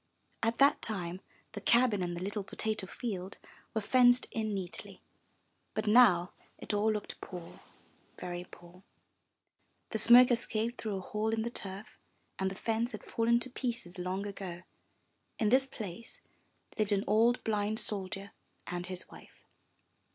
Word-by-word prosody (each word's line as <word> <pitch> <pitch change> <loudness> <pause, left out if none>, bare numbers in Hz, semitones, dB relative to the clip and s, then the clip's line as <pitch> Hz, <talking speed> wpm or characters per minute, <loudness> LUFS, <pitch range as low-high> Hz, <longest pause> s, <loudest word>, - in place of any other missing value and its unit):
At 225 +1 +1
that 280 +1 +5
time 185 -4 -4 0.3
the 205 - -7
cabin 235 -3 +4
and 175 -1 -2
the 175 - -4
little 205 +1 -3
potato 215 0 -3
field 195 -4 -5 0.4
were 220 - +1
fenced 245 +3 +5
in 220 -1 -2
neatly. 190 -3 -6 0.7
But 215 - -1
now 210 -6 +6 0.2
it - - -5
all 210 +2 +3
looked 210 -1 -5
poor, 175 -2 -9 0.6
very 175 0 -5
poor. 175 +1 -15 1.1
The 220 - -1
smoke 245 +3 +8
escaped 230 0 0
through 215 -3 -2
a 190 - -3
hole 215 +3 -2
in 220 0 0
the 235 - -3
turf 195 -1 -7 0.4
and 190 0 +1
the 190 - -7
fence 225 +4 -1
had - - -7
fallen 235 +1 +2
to 255 - -2
pieces 235 -9 -3
long 185 +2 -2
ago. 190 -3 -6 0.7
In 215 - +2
this 265 +3 +4
place 220 -3 -8 0.6
lived 210 -1 +2
an 200 0 +1
old 230 +4 +3
blind 215 0 0
soldier 200 -2 -2 0.3
and 175 0 -4
his 185 -1 -6
wife. - - -16
210 Hz, 150 wpm, -32 LUFS, 190-230 Hz, 1.1 s, smoke